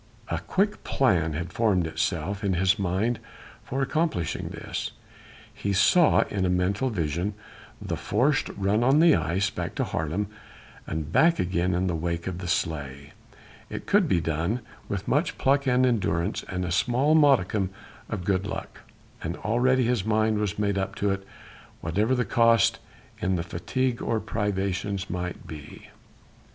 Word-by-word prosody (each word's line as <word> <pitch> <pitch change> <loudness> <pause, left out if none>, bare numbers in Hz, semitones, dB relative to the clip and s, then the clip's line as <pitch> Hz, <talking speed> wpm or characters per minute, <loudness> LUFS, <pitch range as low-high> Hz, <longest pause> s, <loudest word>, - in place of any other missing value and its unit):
A - - -1
quick 205 +2 0
plan 85 - +2
had 85 +4 -4
formed 100 -7 +2
itself 100 +5 -2
in 100 -2 +1
his 95 +3 +2
mind 100 +6 0 0.4
for 135 +2 -2
accomplishing 150 - -1
this - - -5 0.6
he 100 - -2
saw 165 - +5
in 100 -2 -2
a 90 - +2
mental 95 +8 +1
vision 90 0 -2 0.4
the - - -3
forced 125 +7 +1
run 100 +3 +2
on 135 +4 +5
the 165 0 +7
ice 90 +4 0
back - - -4
to - - 0
Haarlem 80 +7 -2 0.6
and 80 -1 -4
back 165 - +4
again 90 0 0
in 90 +1 +1
the 90 - 0
wake 85 +1 -2
of 90 -1 -4
the 90 - -5
sleigh. 70 -6 -2 0.6
It - - -6
could 195 -3 +3
be 90 - +2
done 85 +8 -1 0.3
with 100 0 -3
much 150 +6 +1
pluck 140 +1 +2
and 125 0 +4
endurance 100 -6 0
and 90 -1 -2
a 90 - -3
small 125 - +2
modicum 120 - +4 0.4
of 95 -4 -3
good 95 0 +1
luck, - - -6 0.4
and 85 +2 -4
already 125 +4 +2
his 120 -4 +1
mind 110 0 +2
was 105 -1 -1
made 100 -2 0
up 95 0 -3
to 100 -1 0
it, 95 0 -4 0.5
whatever 105 +10 +1
the 125 -1 0
cost 115 -1 +4 0.4
in 95 -4 0
fatigue 120 +9 -2
or 115 - 0
privations 100 -2 -2
might 90 0 -4
be. 75 -2 -10
100 Hz, 160 wpm, -26 LUFS, 90-120 Hz, 0.6 s, the